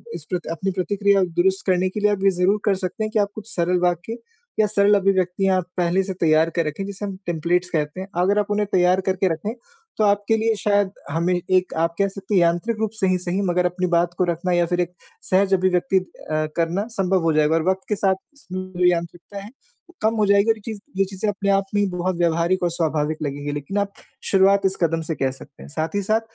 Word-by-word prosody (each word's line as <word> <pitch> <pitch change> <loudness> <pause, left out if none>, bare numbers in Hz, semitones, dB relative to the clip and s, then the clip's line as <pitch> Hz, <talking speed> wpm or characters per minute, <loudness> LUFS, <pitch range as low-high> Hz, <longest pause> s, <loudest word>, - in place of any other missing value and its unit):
इस - - -7 0.3
अपनी 190 +4 -2
प्रतिक्रिया 200 +1 +2
दुरुस्त 180 +2 0
करने 185 0 +2
के 210 - -5
लिए 210 0 +3
आप 205 - -1
ये 195 - +6
ज़रूर 185 +3 +2
कर 205 -2 +3
सकते 185 +3 -4
हैं 215 - -3
कि 220 - +1
आप 200 -1 +1
कुछ 215 +1 -8
सरल 180 +1 +1
वाक्य 175 +5 -1 0.4
या 215 - +4
सरल 205 0 +3
अभिव्यक्तियाँ 190 0 +1 0.2
पहले 180 +2 +2
से 190 0 -4
तैयार 160 0 +4
कर 170 - +2
रखें 155 +6 -4
जिसे 200 +1 -6
हम 195 -2 -5
टेम्पलेट्स 175 +2 0
कहते 150 +2 -2
हैं। 190 - -6
अगर 200 +3 +3
आप 205 - +1
उन्हें 205 0 +1
तैयार 180 +1 +3
करके 190 0 +1
रखें, 205 +8 -4 0.4
तो 215 - +2
आपके 205 +2 +2
लिए 225 0 +1
शायद 205 -2 +1 0.2
हमें 170 +3 +1
एक 185 +1 0
आप 165 +1 +1
कह 200 - +3
सकते 195 +1 -6
हैं 180 - +5
यांत्रिक 175 +7 +1
रूप 220 -2 -1
से 190 - +2
ही 185 0 +2
सही 180 +2 -2
मगर 180 -2 +1
अपनी 180 +1 0
बात 170 0 +1
को 185 - +2
रखना 175 +1 -1
या 175 0 +3
फिर 175 +1 -1
एक 175 0 -3 0.4
सहज 190 +1 +3
अभिव्यक्ति 185 0 +2
अ, 155 -4 -4
करना 170 +5 0
संभव 190 -4 +1
हो 165 -1 +2
जाएगा 155 +1 +3
और 165 - +1
वक़्त 190 0 0
के 210 - +1
साथ 195 -1 +2 0.2
इसमें 185 -8 -7
जो 180 - +3
यांत्रिकता 175 +3 -1
है, 205 - -10 0.4
वो 350 - -19
कम 220 +1 +2
हो 210 - +3
जाएगी 200 +2 +3
चीज़ 220 -1 -6 0.2
ये 195 - +3
चीज़ें 195 +2 -3
अपने 200 0 -3
आप 195 0 +2
में 205 - +3
ही 200 - +2
बहुत 180 0 -2
व्यवहारिक 170 +2 +1
और 175 - +2
स्वाभाविक 155 -2 -1
लगेंगी 145 0 -3
लेकिन 145 +7 -4
आप 200 0 -2 0.4
शुरुआत 195 0 +4
इस 190 0 +2
कदम 165 0 +1
से - - -1
कह 135 -2 0
सकते 135 +1 -13
हैं। - - -11
साथ 160 +4 -3
ही 200 - +1
साथ 215 +3 +1
185 Hz, 235 wpm, -22 LUFS, 170-200 Hz, 0.4 s, ये